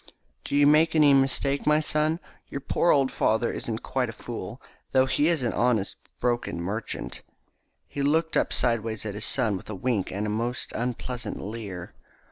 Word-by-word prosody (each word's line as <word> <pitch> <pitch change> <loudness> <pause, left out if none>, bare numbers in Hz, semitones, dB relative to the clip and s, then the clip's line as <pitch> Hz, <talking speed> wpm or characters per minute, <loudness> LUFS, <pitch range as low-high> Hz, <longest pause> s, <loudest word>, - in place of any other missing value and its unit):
"Don't 140 - -1
you 145 - +6
make 155 +2 +5
any 150 -2 +6
mistake, 135 +1 +2
my 150 0 +5
son. 155 +1 +1 0.3
Your 140 - -4
poor 170 +4 +1
old 135 -4 +4
father 110 +2 +1
isn't 115 0 -4
quite 125 -3 -1
a - - -6
fool, 115 -1 -7 0.3
though 130 -1 +5
he 140 +3 +2
is 165 -6 +2
only 120 - 0
an - - 0
honest 120 -5 +1 0.2
broken 120 -8 -1
merchant." 100 +6 -4 0.7
He 140 - -5
looked 160 +3 +1
up - - +2
sideways 115 -3 0
at 105 - -3
his 105 +1 -2
son 115 -6 +2
with - - -12
a 105 - -4
wink 105 -1 -1
and 100 +3 -2
a - - -1
most 120 +3 -2
unpleasant 125 0 -4
leer. 100 -4 -6
125 Hz, 185 wpm, -26 LUFS, 110-140 Hz, 0.7 s, you